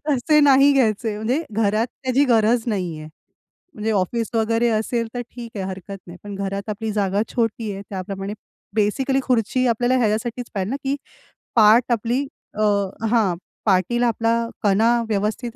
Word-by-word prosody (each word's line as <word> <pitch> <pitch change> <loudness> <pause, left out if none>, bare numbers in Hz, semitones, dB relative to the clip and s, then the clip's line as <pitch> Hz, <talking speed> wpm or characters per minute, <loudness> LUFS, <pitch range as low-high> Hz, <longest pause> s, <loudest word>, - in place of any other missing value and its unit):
तसे 300 +2 +3
नाही 280 0 +6
घ्यायचे. 225 -4 +1
म्हणजे 245 +9 -1
घरात 215 +1 +1 0.2
त्याची 260 +2 +3
गरज 230 -2 +3
नाहीये. 175 -8 -3 0.7
म्हणजे 220 +1 -2
ऑफिस 215 +3 0
वगैरे 230 +1 +2
असेल 230 +1 0
तर 245 - -3
ठीक 235 -2 -9
आहे 190 - -2
हरकत 190 +1 -7
नाही. 175 +1 -10
पण 205 -1 -7
घरात 200 +1 -4
आपली 215 +1 -3
जागा 200 -1 0
छोटी 225 -2 -1
आहे 195 - -7
त्याप्रमाणे 195 +1 -5 0.4
बेसिकली 260 +6 +1
खुर्ची 250 +1 +1
आपल्याला 245 +2 +2
ह्याच्यासाठीच 230 +1 -1
पाहिजे 195 -2 -2
ना - - -1
की 275 +1 0 0.6
पाठ 220 +1 +7
आपली 235 +4 0 0.3
अ, 215 - -1 0.5
हां 215 -7 +3 0.3
पाठीला 225 +5 +2
आपला 230 0 +1 0.3
कणा 210 +3 +3 0.2
व्यवस्थित 220 +3 -2
225 Hz, 150 wpm, -22 LUFS, 205-240 Hz, 0.7 s, पाठ